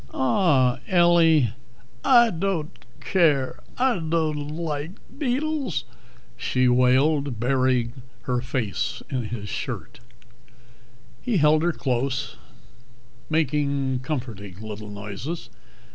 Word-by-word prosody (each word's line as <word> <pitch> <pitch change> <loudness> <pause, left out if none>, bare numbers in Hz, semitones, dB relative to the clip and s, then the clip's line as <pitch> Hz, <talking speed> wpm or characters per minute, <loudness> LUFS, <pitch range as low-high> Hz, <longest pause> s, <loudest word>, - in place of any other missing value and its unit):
"Aw, 130 -2 +3
Ellie 165 - +4 0.3
" - - -28 0.2
"I 240 -3 +6
dod't 170 -3 -3
care, 150 -8 +2 0.2
I 250 -6 +2
dod't 155 -3 -1
like 155 0 -4 0.2
deedles!" 275 - -1 0.5
she 125 +2 +1
wailed, 130 +1 +3
burying 130 0 +1 0.2
her 125 -1 -1
face 125 - -3
in 125 -4 -1
his 105 -2 -5
shirt. - - -5 1.2
He 235 -5 0
held 155 0 +4
her 175 +1 +2
close, 130 -3 -2 0.9
making 140 -4 0
comforting 115 - -5
little 105 -1 -7
noises. 105 - -6
140 Hz, 100 wpm, -24 LUFS, 125-165 Hz, 1.2 s, I